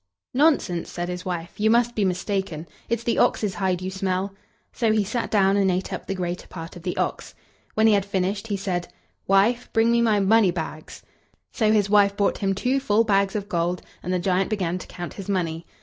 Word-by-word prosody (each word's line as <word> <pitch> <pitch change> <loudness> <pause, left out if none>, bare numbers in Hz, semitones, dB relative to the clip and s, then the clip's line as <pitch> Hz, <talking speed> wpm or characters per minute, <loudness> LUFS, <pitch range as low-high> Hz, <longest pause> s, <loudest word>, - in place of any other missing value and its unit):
"Nonsense!" 270 - +2
said 175 0 -4
his 180 0 -5
wife; 175 -1 -5
"you 215 +1 +3
must 240 +1 +3
be 215 - 0
mistaken. 185 -3 -2 0.2
It's 235 0 -1
the 235 - 0
ox's 205 -3 +2
hide 185 -2 -1
you 185 - -3
smell." 190 0 -2 0.4
So 225 -3 +1
he 215 -1 +2
sat 225 +4 -3
down, 195 -2 +3
and 195 -1 +3
ate 185 +1 -1
up - - -6
the 195 - -2
greater 180 -1 -4
part 165 0 -8
of 175 - -10
the 180 +1 -4
ox. - - -3 0.4
When 220 - +3
he 220 - +6
had 200 -1 +3
finished 200 +2 -2
he 205 -2 -1
said: 180 -3 -2 0.4
"Wife, 210 +6 +3
bring 225 0 +4
me 235 0 +3
my 220 -3 +3
money 205 0 +4
bags." 160 -2 -6 0.5
So 215 -2 +2
his 210 -2 +3
wife 200 -1 +4
brought 200 - +1
him 195 -2 0
two 255 +7 +1
full 225 -4 +2
bags 200 -2 +1
of 205 -1 -3
gold, 175 -1 -1 0.2
and 180 - -4
the 185 - +2
giant 185 +1 +1
began 185 -4 -1
to - - -10
count 175 -1 -7
his 195 -1 -8
money. 170 -4 -2
195 Hz, 215 wpm, -24 LUFS, 180-215 Hz, 0.5 s, he